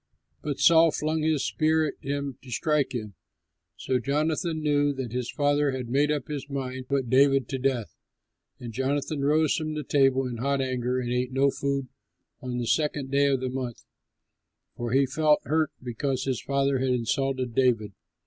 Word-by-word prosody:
But 145 -2 -4
Saul 165 0 +6
flung 155 +1 -1
his 155 -3 +1
spear 160 0 +2
at 145 - -3
him 140 -2 -4
to 130 - -14
strike 140 0 0
him. 105 -4 -5 0.6
So 130 -1 0
Jonathan 155 +5 -1
knew 145 -1 +2
that 130 -4 -5
his 125 -1 -2
father 145 0 +1
had 125 -2 -5
made 145 +4 +2
up 145 -3 -2
his 145 -1 -5
mind 130 -2 -4
to - - -40
put 130 -4 -1
David 135 -1 +4
to 135 - -3
death. 125 -4 -1 0.7
And 120 -2 -7
Jonathan 140 +3 -1
rose 150 +1 +3
from 155 -1 -3
the 150 - -3
table 135 -1 +3
in 125 -2 -4
hot 140 +3 0
anger 130 -1 -1
and 120 -1 -3
ate 125 +1 -1
no 135 +1 +3
food 140 -1 -2 0.5
on 125 -1 -4
the 120 - -2
second 145 0 0
day 140 0 +3
of 135 -2 +1
the 130 - -2
month, 125 -2 -5 0.9
for 120 -1 -4
he 135 +2 +4
felt 150 +3 +2
hurt 155 +3 +1
because 130 +2 -2
his 130 -3 -2
father 140 -1 +1
had 130 0 0
insulted 130 +1 -1
David. 115 -5 +1
135 Hz, 185 wpm, -26 LUFS, 125-145 Hz, 0.9 s, Saul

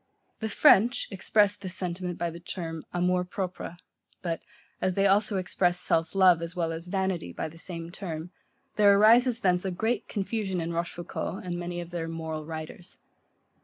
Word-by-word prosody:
The 220 - -2
French 215 +3 +5
express 205 +1 +3
this 185 -3 -6
sentiment 180 -1 -3
by 170 0 -1
the 170 - -9
term, 165 -2 -6
AMOUR 180 +1 +1
PROPRE, 180 -1 -5 0.5
but 165 -2 -2 0.4
as 185 -1 +1
they 195 - +3
also 200 +1 +3
express 180 -1 +1
self 165 +2 +1
love 185 -3 +6
as 170 +2 -5
well 165 -2 0
as 165 +2 -7
vanity 190 - -1
by - - -4
the 165 +1 -12
same 170 -1 -6
term, 175 -2 -6 0.5
there 200 -1 +6
arises 235 +3 +5
thence 180 -4 +2
a 190 - -1
great 220 +7 -1
confusion 200 -2 -2
in 170 0 -3
Rochefoucault, 175 +2 -4
and 180 -1 -3
many 175 0 -4
of 175 0 -7
their 170 -2 -3
moral 160 -2 -5
writers. 160 +2 -7
180 Hz, 170 wpm, -28 LUFS, 170-195 Hz, 0.5 s, love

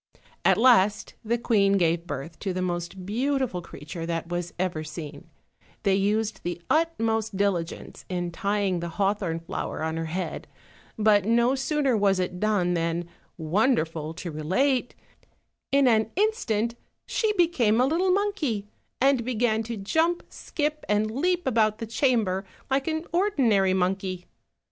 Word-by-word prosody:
At - - +4
last 215 -5 +4
the 230 +2 0
queen 205 -4 +3
gave 170 -2 +1
birth 160 +2 -6
to 195 -3 -2
the 185 - -2
most 175 +1 -4
beautiful 250 -2 -1
creature 165 +1 -8
that 165 0 -3
was 175 0 -3
ever 175 -3 -1
seen: 155 0 -8 0.5
they 200 -2 +3
used 205 +1 0
the 175 0 -4
utmost 225 -10 +1
dili 200 -4 +2
gence 165 - -10
in 175 -1 -2
tying 200 -1 0
the 170 0 -4
hawthorn 195 -5 0
flower 165 -2 -4
on 160 0 -2
her 165 - -2
head; 180 +4 -4 0.5
but 210 -2 +4
no 235 +3 +3
sooner 270 -1 +1
was 200 -2 +3
it 180 -1 -2
done 200 -4 +1
than, 170 0 -1 0.3
wonderful 165 - 0
to 175 -1 -6
relate, 245 - 0 0.8
in 275 -1 +4
an 220 -2 +3
instant 235 - +1 0.3
she 440 -2 0
became 275 - +3
a 250 - +5
little 340 +7 +1
monkey, 365 - 0 0.3
and 270 -2 +3
began 230 -2 +1
to 225 0 -5
jump, 320 - +1
skip, 300 0 -3
and 210 +1 +2
leap 355 +8 0
about 220 -4 +2
the 225 - -5
chamber 220 -5 +1 0.3
like 270 +2 +1
an 315 +1 -1
ordinary 240 - +3
monkey. 185 -1 -1
210 Hz, 150 wpm, -26 LUFS, 180-255 Hz, 0.8 s, a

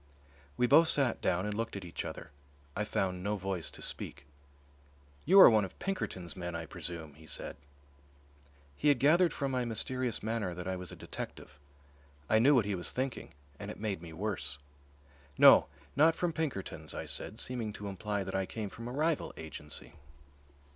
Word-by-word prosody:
We 125 - +4
both 155 +6 +7
sat 140 -5 +2
down 90 +1 +1
and 105 - -2
looked 115 +1 -3
at 100 -2 -5
each 85 - -5
other. - - -7 0.4
I 105 - 0
found 95 -3 -1
no 105 +1 0
voice 95 -5 -3
to - - -9
speak. - - -6 1.0
"You 190 +5 +7
are - - +12
one 110 -3 +5
of 95 - -7
Pinkerton's 95 - -3
men, 85 -2 -5
I 85 -1 -4
presume," 80 0 -6
he 80 +2 -16
said. - - -5 1.2
He 150 - 0
had 145 -2 +6
gathered 165 +6 +5
from 140 -2 -2
my 125 -1 0
mysterious 120 +1 -2
manner 110 -5 -1
that 90 +1 -6
I 95 - -1
was 90 -1 -7
a - - -8
detective. 70 - -8 0.7
I 110 - +4
knew 140 +5 +6
what 120 -5 +4
he 105 - -1
was 90 -2 -3
thinking, 130 - -4 0.2
and 100 - -6
it - - -7
made 100 -5 -2
me 85 -1 -9
worse. 80 -6 -3 0.8
"No, - - +8 0.3
not 160 +3 +5
from 175 -2 -1
Pinkerton's," 100 - -3
I - - -4
said, 110 - -4
seeming 120 -4 -3
to 100 0 -6
imply 100 +1 -2
that 95 0 -6
I 95 -1 0
came 105 -3 -5
from 115 0 -8
a - - -5
rival 155 +3 0
agency. 80 -3 -7
105 Hz, 185 wpm, -32 LUFS, 90-130 Hz, 1.2 s, are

